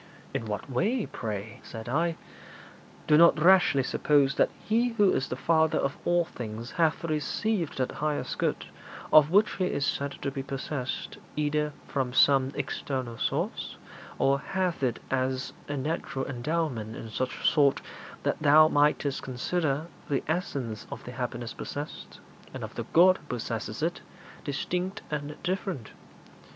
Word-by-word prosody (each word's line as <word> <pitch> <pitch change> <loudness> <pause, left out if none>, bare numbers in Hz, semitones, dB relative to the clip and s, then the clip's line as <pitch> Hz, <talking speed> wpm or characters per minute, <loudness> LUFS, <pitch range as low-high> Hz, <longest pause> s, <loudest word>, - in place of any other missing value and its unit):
'In 115 - -2
what 105 -1 -4
way, 200 - 0
pray?' 110 -1 -5
said 110 0 -8
I. 165 +6 +1 0.9
'Do 150 0 +5
not 170 -2 +7
rashly 175 -5 +5
suppose 140 0 +3
that - - +3
He 235 +2 +1
who 205 -4 +4
is 130 - 0
the - - -2
Father 160 +3 +2
of 140 - 0
all 175 0 +3
things 115 -3 -7
hath 165 -2 +1
received 165 +3 -1
that 130 -1 0
highest 150 -1 -2
good - - 0 0.5
of 150 -1 +8
which 205 +3 +3
He 185 - +1
is 140 -5 0
said 140 0 -1
to 140 - -1
be 135 0 -4
possessed 135 -1 -4 0.2
either 150 0 0
from 130 -3 -1
some 135 0 +5
external 130 -4 -3
source, - - -2 0.4
or 140 0 +3
hath 185 0 -1
it 125 -4 +1
as 130 0 -1
a 145 - -3
natural 135 -1 -2
endowment 125 -4 -2
in 110 - -8
such 130 +3 -1
sort 140 -3 +4 0.4
that - - -1
thou 155 +1 +7
mightest 145 -2 +2
consider 145 +3 -1 0.2
the 140 - 0
essence 140 - -2
of - - -7
the 125 - -7
happiness 120 -2 -4
possessed, 145 +1 -7 0.4
and - - -5
of - - -6
the - - -4
God 185 +2 +7
who - - -20
possesses 115 0 -4
it, 170 +2 -1 0.4
distinct 180 +7 -2
and 150 0 -3
different. 180 - -3
145 Hz, 150 wpm, -28 LUFS, 130-165 Hz, 0.9 s, of